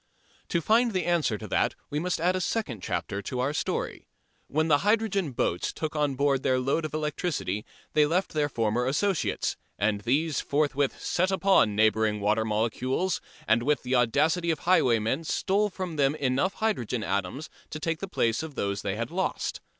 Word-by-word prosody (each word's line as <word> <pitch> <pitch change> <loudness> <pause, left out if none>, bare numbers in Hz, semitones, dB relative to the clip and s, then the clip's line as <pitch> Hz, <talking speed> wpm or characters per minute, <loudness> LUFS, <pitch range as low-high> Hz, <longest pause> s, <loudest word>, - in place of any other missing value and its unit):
To 170 - +1
find 225 +6 +3
the 185 -2 0
answer 165 -11 +1
to - - -8
that - - +1 0.2
we 145 - 0
must 180 +2 -1
add 180 +3 +2
a 185 - -1
second 165 - -2
chapter 95 +3 -3
to 125 +5 -4
our 135 +3 0
story. - - -3 0.4
When 155 +2 +1
the 145 -2 +4
hydrogen 205 -6 +1
"boats" 90 -7 -1
took 155 -1 -4
on 145 -2 +1
board 140 0 +2
their 130 -1 +2
load 140 +5 0
of 155 -1 -4
electricity 150 - -2 0.3
they 150 -1 +4
left 180 +5 0
their 150 -1 +1
former 115 0 0
associates, 185 +7 0 0.2
and 105 0 +1
these 145 +7 +1
forthwith 145 -1 0
"set 185 +2 0
upon" 190 - +3
neighbouring 110 0 +2
water 105 +2 +2
molecules 120 - -1 0.3
and 110 +2 +4
with 145 +4 +1
the 125 +1 -2
audacity 150 +8 +2
of 160 -3 0
highwaymen 130 -5 +2
stole 200 +5 +1
from 185 -4 -5
them 140 0 +3
enough 140 +6 0
hydrogen 125 - -1
atoms 100 +11 -2 0.2
to 155 - -6
take 165 +1 -2
the 195 - -4
place 115 -10 0
of 160 -3 -7
those 100 -3 -2
they 100 -1 -2
had 115 +2 -4
lost. 190 +2 -2
145 Hz, 180 wpm, -27 LUFS, 115-175 Hz, 0.4 s, the